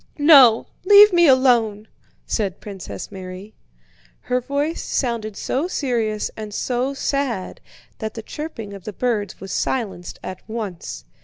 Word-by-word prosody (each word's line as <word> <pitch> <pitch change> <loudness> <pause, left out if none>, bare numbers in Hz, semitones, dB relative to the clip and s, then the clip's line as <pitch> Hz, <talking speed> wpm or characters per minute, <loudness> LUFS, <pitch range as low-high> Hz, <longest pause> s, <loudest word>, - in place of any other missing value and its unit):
"No, 275 -7 +7 0.2
leave 410 +1 +8
me 345 -1 +5
alone," 235 -6 +3 0.4
said 195 -5 -2
Princess 195 -3 -8
Mary. 190 +2 -9 0.7
Her 250 0 -1
voice 285 +5 -2
sounded 230 -5 -2
so 280 +7 -1
serious 230 -10 -1
and 210 -1 -7
so 255 +2 -1
sad 275 -9 -2 0.4
that 220 -1 -5
the 225 - -6
chirping 230 -8 -7
of 195 -3 -11
the 215 - -5
birds 215 -4 -2
was 190 -1 -8
silenced 200 -9 -3
at 185 - -7
once. 190 - -6
225 Hz, 135 wpm, -21 LUFS, 205-270 Hz, 0.7 s, leave